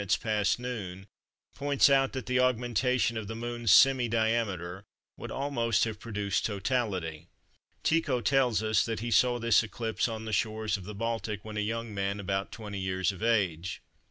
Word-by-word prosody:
past 105 -2 +1
noon 100 -7 -6 0.5
points 140 -1 +3
out 135 -1 +3
that 130 -4 -5
the 125 +3 +1
augmentation 125 -2 +1
of 110 -2 -5
the 110 - -5
Moon's 120 0 -3
semi 130 +4 +6
diameter 110 -5 -1 0.3
would - - -8
almost 135 -5 0
have 110 -2 -3
produced 105 -3 -2
totality. 95 -7 -2 0.6
Tycho 150 -6 +2
tells 125 -4 +2
us 110 0 +2
that 115 -2 -3
he 120 0 -3
saw 125 +1 +4
this 115 -2 +4
eclipse 115 0 -2
on 110 -1 -5
the 110 - -4
shores 110 0 0
of 95 -3 -7
the 105 +1 -7
Baltic 110 -1 -3
when 110 -1 -7
a - - -1
young 115 +1 -3
man 100 0 -2
about 95 0 -2
20 105 -3 -6
years 95 -1 0
of 95 0 -11
age. 95 -7 0
110 Hz, 170 wpm, -29 LUFS, 100-120 Hz, 0.6 s, semi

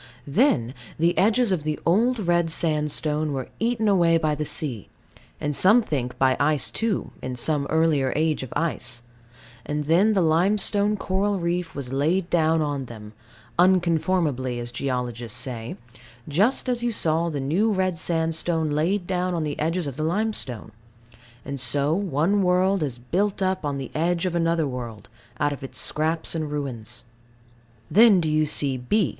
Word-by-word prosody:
Then 140 - +2 0.2
the 170 +2 +2
edges 225 +3 +3
of 180 -4 +1
the 150 0 -3
old 230 +9 +3
red 175 -4 +1
sandstone 150 -1 0
were 130 -2 -4
eaten 230 -1 0
away 170 -4 +4
by 155 -2 0
the 150 +1 -3
sea 130 - -2 0.5
and 145 -1 -2
some 215 - +5
think 125 - -3
by 130 0 +3
ice 150 -2 +2
too, 225 -3 -2
in 130 0 -4
some 140 +3 +1
earlier 155 -5 +2
age 155 0 +1
of 130 - -7
ice; 130 -7 -2 0.6
and 150 0 -2
then 180 +9 +3
the 195 - +2
limestone 200 +5 +2
coral 200 +1 0
reef 175 -1 -2
was 135 -2 -5
laid 170 +6 0
down 160 -1 +3
on 145 -3 -3
them, 110 -3 -11 0.5
"unconformably," 165 -8 +2
as 120 0 -5
geologists 120 -3 -2
say 115 -4 -5 0.5
just 205 - +1
as 245 -1 0
you 240 0 0
saw 165 -4 0
the 150 -3 -3
new 170 +12 +1
red 185 -4 0
sandstone 160 -1 0
laid 175 +6 0
down 180 0 -1
on 165 - -1
the 150 -1 -4
edges 165 +3 0
of 140 -2 -5
the 155 - -2
limestone; 165 - -2 0.7
and 140 -1 -5
so 140 +4 +1
one 185 +1 +1
world 185 +1 +2
is 135 -5 -2
built 190 +12 -1
up 185 -1 0
on 145 -1 -2
the 135 - -6
edge 170 +3 0
of 180 - -1
another 165 -2 +1
world, 120 -6 -7 0.3
out 145 0 +1
of 140 - -9
its 135 - -5
scraps 160 +1 -1
and 160 -2 -3
ruins. 135 -7 -4 0.9
Then 215 -2 +7
do 160 -3 0
you 155 0 +2
see 140 -2 +1
B. 155 - +1
160 Hz, 165 wpm, -24 LUFS, 140-185 Hz, 0.9 s, Then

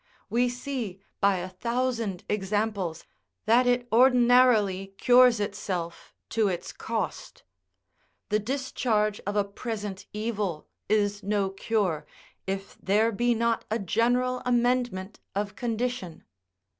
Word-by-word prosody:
We 245 +2 +3
see 245 -6 -4 0.2
by 200 -1 +3
a 180 +1 -4
thousand 230 0 -2
examples, 205 -4 -1 0.4
that 240 +3 +4
it 245 0 +2
ordinarily 240 -6 +4
cures 245 -2 +6
itself 190 -4 -4
to 220 -2 +2
its 180 -2 -3
cost. 230 - -4 0.9
The 210 0 +2
discharge 220 -3 -1
of 205 - -1
a 205 - +3
present 205 -1 -6
evil 210 -6 -3 0.2
is 205 -1 +1
no 200 -1 0
cure, 195 -5 -1 0.4
if 195 +1 -4
there 215 +4 +2
be 240 +3 +1
not 230 0 +1
a 220 - +1
general 245 +5 +1
amendment 245 -5 0 0.2
of 205 0 -2
condition. 235 -6 -3
215 Hz, 115 wpm, -27 LUFS, 195-245 Hz, 0.9 s, cures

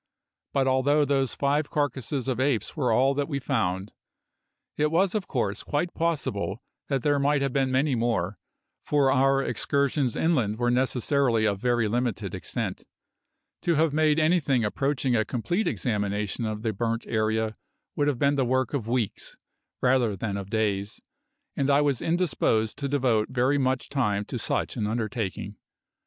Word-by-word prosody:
But 135 -1 +1
although 140 +3 +3
those 135 -2 0
five 145 +2 0
carcasses 135 -2 -2
of 130 -1 -1
apes 130 -6 0
were 130 -6 +1
all 130 +5 +3
that 140 0 -1
we 140 - -1
found, 105 -8 -1 0.8
it 150 0 +1
was 180 +4 +2
of 210 -4 -2
course 105 -7 -1
quite 160 +4 -2
possible 140 -11 -2 0.2
that 135 -4 -1
there 145 -1 +2
might 140 0 +2
have 135 -2 -1
been 135 -1 +1
many 135 +2 +2
more, 110 -6 -1 0.4
for 140 -2 +2
our 135 +1 +3
excursions 140 +1 0
inland 125 -11 +1
were 120 0 +1
necessarily 125 -2 +1
of 100 -2 0
very 120 -1 +1
limited 120 0 -2
extent. - - -4 0.8
To 170 - +1
have 155 -1 +2
made 155 0 +3
anything 155 -7 +2
approaching 135 +3 0
a 110 - +3
complete 175 - -1
examination 105 -1 -1
of 110 0 -4
the 110 -2 0
burnt 115 +2 -2
area 110 0 0 0.4
would 145 - +1
have 145 -4 +1
been 140 +3 +2
the 140 -2 +1
work 130 +2 0
of 125 -6 -2
weeks, 120 -4 -2 0.5
rather 125 -5 +3
than 100 +1 -3
of 100 -1 -5
days, 105 -2 -1 0.6
and 140 0 0
I 140 +1 +5
was 140 -4 +1
indisposed 160 -10 +1
to 140 -1 -2
devote 125 -6 +1
very 130 +3 +1
much 130 -2 0
time 105 -7 0
to - - -5
such - - -1
an 105 - -1
undertaking. 110 -3 -3
130 Hz, 165 wpm, -26 LUFS, 110-145 Hz, 0.8 s, I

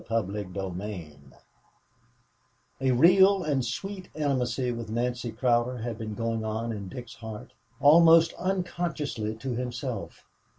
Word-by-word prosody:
CHAPTER 105 -2 -1
VIII 90 -4 -6 1.6
A 135 - +2
real 190 +8 +6
and 140 -5 0
sweet 185 - -5
intimacy 130 -4 0
with 115 -2 -5
Nancy 120 +1 -2
Cowder 125 0 +1
had 115 -1 -5
been 110 -1 -5
going 115 0 -2
on 110 +2 -2
in 100 -3 -6
Dick's 120 +3 -8
heart 110 -2 -9 0.3
almost 165 +2 +7
unconsciously 170 - -2
to 130 +3 -4
himself. 125 -2 -5
120 Hz, 120 wpm, -27 LUFS, 110-145 Hz, 1.6 s, almost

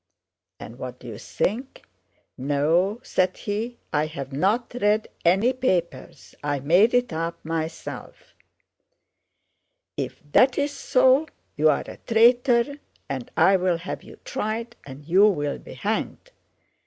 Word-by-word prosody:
And 115 +3 -10
what 125 -1 -6
do - - -15
you 115 -4 -7
think? 245 +7 -3 0.5
'No,' 155 - +1
said 185 0 0
he, 225 +4 -4 0.2
'I 150 +1 +1
have 140 -4 -7
not 205 - 0
read 210 +1 +2 0.2
any 195 +9 +3
papers, 175 - -2
I 145 -1 -1
made 180 - +4
it 245 -7 +1
up 165 +1 -4
myself.' 160 0 -6 1.6
'If - - -5
that's 275 - +4
so, 260 +2 +3 0.3
you're 150 0 +3
a - - -10
traitor 240 +4 +4 0.3
and 130 -3 -5
I'll 185 -2 +4
have 170 - -6
you - - -13
tried, 230 - -3
and 140 +2 -10
you'll 170 -4 +3
be - - -11
hanged! 220 - -3
185 Hz, 120 wpm, -24 LUFS, 150-235 Hz, 1.6 s, made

